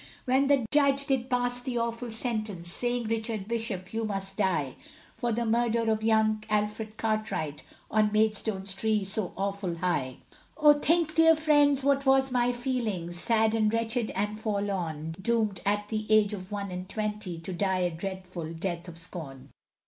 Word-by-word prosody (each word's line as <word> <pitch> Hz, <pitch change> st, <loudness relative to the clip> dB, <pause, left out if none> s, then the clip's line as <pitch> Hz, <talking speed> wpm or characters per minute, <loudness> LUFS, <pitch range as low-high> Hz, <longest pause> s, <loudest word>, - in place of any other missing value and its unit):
When 265 Hz, +2 st, +3 dB
the 275 Hz, -4 st, +3 dB
Judge 280 Hz, -1 st, +3 dB
did 265 Hz, -2 st, 0 dB
pass 245 Hz, 0 st, +1 dB
the 245 Hz, -1 st, -3 dB
awful 235 Hz, +1 st, -2 dB
sentence 215 Hz, -6 st, -3 dB
Saying, 245 Hz, 0 st, 0 dB
Richard 220 Hz, -2 st, -2 dB
Bishop, 225 Hz, -5 st, -3 dB
you 225 Hz, 0 st, -1 dB
must 195 Hz, -2 st, -2 dB
die, 165 Hz, -10 st, 0 dB, 0.4 s
For 240 Hz, -, -2 dB
the 235 Hz, +1 st, 0 dB
murder 230 Hz, 0 st, +2 dB
of 220 Hz, 0 st, 0 dB
young 220 Hz, -1 st, +2 dB
Alfred 210 Hz, +1 st, -1 dB
Cartwright, 215 Hz, -9 st, -2 dB, 0.3 s
On 215 Hz, -1 st, +3 dB
Maidstone's 215 Hz, -2 st, +1 dB
tree 215 Hz, +1 st, 0 dB
so 195 Hz, -1 st, -2 dB
awful 195 Hz, -2 st, -2 dB
high; 165 Hz, -7 st, -1 dB, 0.4 s
Oh 300 Hz, -1 st, +7 dB
think, 315 Hz, +2 st, +2 dB
dear 325 Hz, 0 st, +6 dB
friends, 290 Hz, -3 st, +3 dB
what 275 Hz, 0 st, +2 dB
was 265 Hz, 0 st, +4 dB
my 245 Hz, -1 st, +2 dB
feelings, 225 Hz, -9 st, -2 dB
Sad 220 Hz, 0 st, +2 dB
and 215 Hz, -1 st, +2 dB
wretched 230 Hz, 0 st, 0 dB
and 210 Hz, +2 st, -2 dB
forlorn, 190 Hz, -8 st, -2 dB
Doomed 220 Hz, -2 st, 0 dB
at 205 Hz, 0 st, 0 dB
the 215 Hz, -1 st, -3 dB
age 215 Hz, -1 st, +5 dB
of 185 Hz, -1 st, -7 dB
one 200 Hz, -2 st, -4 dB
and 180 Hz, +1 st, -6 dB
twenty, 210 Hz, -5 st, -3 dB
To 175 Hz, +3 st, -6 dB
die 190 Hz, 0 st, 0 dB
a 175 Hz, -1 st, +1 dB
dreadful 180 Hz, -1 st, -6 dB
death 170 Hz, +1 st, -4 dB
of 170 Hz, -1 st, -9 dB
scorn. 160 Hz, -6 st, -8 dB
215 Hz, 165 wpm, -28 LUFS, 190-240 Hz, 0.4 s, Oh